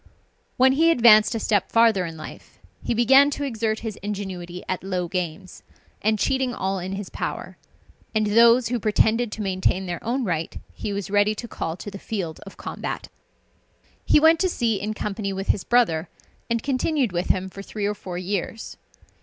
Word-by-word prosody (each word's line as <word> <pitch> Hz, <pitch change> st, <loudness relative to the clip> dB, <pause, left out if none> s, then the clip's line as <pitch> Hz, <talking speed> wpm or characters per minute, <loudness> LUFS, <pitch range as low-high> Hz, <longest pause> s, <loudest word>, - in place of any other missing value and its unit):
When 260 Hz, +1 st, +5 dB
he 320 Hz, +5 st, +4 dB
advanced 230 Hz, -7 st, +6 dB
a -, -, -1 dB
step 205 Hz, -2 st, 0 dB
farther 225 Hz, -6 st, +4 dB
in 165 Hz, -1 st, -8 dB
life, 155 Hz, -, -11 dB, 0.3 s
he 235 Hz, -, -1 dB
began 265 Hz, +5 st, +6 dB
to 290 Hz, 0 st, -4 dB
exert 225 Hz, -4 st, -2 dB
his 220 Hz, -3 st, -5 dB
ingenuity 190 Hz, -3 st, -6 dB
at 185 Hz, -, -3 dB
low 180 Hz, -2 st, -2 dB
games, 180 Hz, +1 st, -5 dB, 0.4 s
and 215 Hz, +1 st, +2 dB
cheating 260 Hz, +2 st, 0 dB
all 190 Hz, 0 st, -2 dB
in 185 Hz, +2 st, -5 dB
his 195 Hz, 0 st, -6 dB
power; -, -, -5 dB, 0.6 s
and 215 Hz, 0 st, +2 dB
those 230 Hz, +3 st, +5 dB
who 245 Hz, -1 st, -1 dB
pretended 220 Hz, +2 st, +2 dB
to 215 Hz, -, -4 dB
maintain 190 Hz, 0 st, 0 dB
their 175 Hz, -2 st, -5 dB
own 250 Hz, +4 st, -1 dB
right, 165 Hz, -6 st, -2 dB, 0.2 s
he 210 Hz, -, -5 dB
was 200 Hz, -1 st, -4 dB
ready 205 Hz, +1 st, +3 dB
to 235 Hz, -, -7 dB
call 165 Hz, -6 st, -4 dB
to 205 Hz, -, -8 dB
the 195 Hz, -, -8 dB
field 185 Hz, -8 st, -4 dB
of 195 Hz, -, -12 dB
combat. -, -, -5 dB, 0.9 s
He -, -, +5 dB
went 320 Hz, +1 st, +5 dB
to 370 Hz, -, +2 dB
sea 230 Hz, -, 0 dB
in 215 Hz, +1 st, -3 dB
company 205 Hz, -1 st, -3 dB
with 195 Hz, +1 st, -5 dB
his 190 Hz, -, +2 dB
brother, 220 Hz, -10 st, +2 dB, 0.4 s
and 230 Hz, -1 st, -1 dB
continued 275 Hz, -, 0 dB
with 175 Hz, 0 st, -2 dB
him 190 Hz, 0 st, +1 dB
for 195 Hz, +1 st, -9 dB
three 205 Hz, +1 st, -5 dB
or 205 Hz, -, 0 dB
four 185 Hz, -3 st, -7 dB
years. 195 Hz, +4 st, -4 dB
210 Hz, 185 wpm, -24 LUFS, 190-235 Hz, 0.9 s, advanced